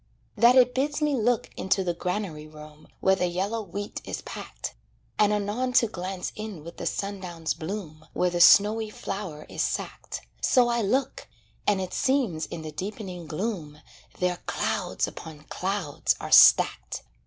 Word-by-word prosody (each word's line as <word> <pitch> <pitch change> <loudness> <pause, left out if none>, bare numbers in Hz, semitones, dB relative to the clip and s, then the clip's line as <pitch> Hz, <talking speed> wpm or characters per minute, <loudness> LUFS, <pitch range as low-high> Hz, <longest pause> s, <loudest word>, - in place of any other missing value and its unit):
That 240 +2 +6
it 250 -1 +6
bids 285 +4 0
me 300 -1 +1
look 240 -2 +1
into 190 0 +1
the 175 -2 0
granary 175 -3 -3
room 150 0 -13
Where 190 0 +4
the 180 -1 0
yellow 195 +6 -2
wheat 205 +1 -6
is - - -5
packed; - - -7 0.5
And 210 -1 +5
anon 210 +5 -1
to 240 - +5
glance 185 -3 -4
in 210 -7 -7
with 170 +1 -10
the - - -3
sundown's 180 -5 -3
bloom 160 -3 -7
Where 180 0 +1
the 175 0 0
snowy 215 +4 +6
flour 195 -7 -6
is - - -4
sacked, - - -3 0.2
So 245 -2 +4
I 235 0 +1
look 255 +6 -1 0.4
and 205 -2 +3
it 185 -1 -4
seems 240 - +1
in 165 -2 -7
the 155 - -6
deepening 185 0 -6
gloom 155 -3 -4 0.4
There 180 -1 0
clouds - - -1
upon 155 -2 -9
clouds 185 -1 -1
are - - -6
stacked. - - +6
195 Hz, 160 wpm, -26 LUFS, 170-220 Hz, 0.5 s, That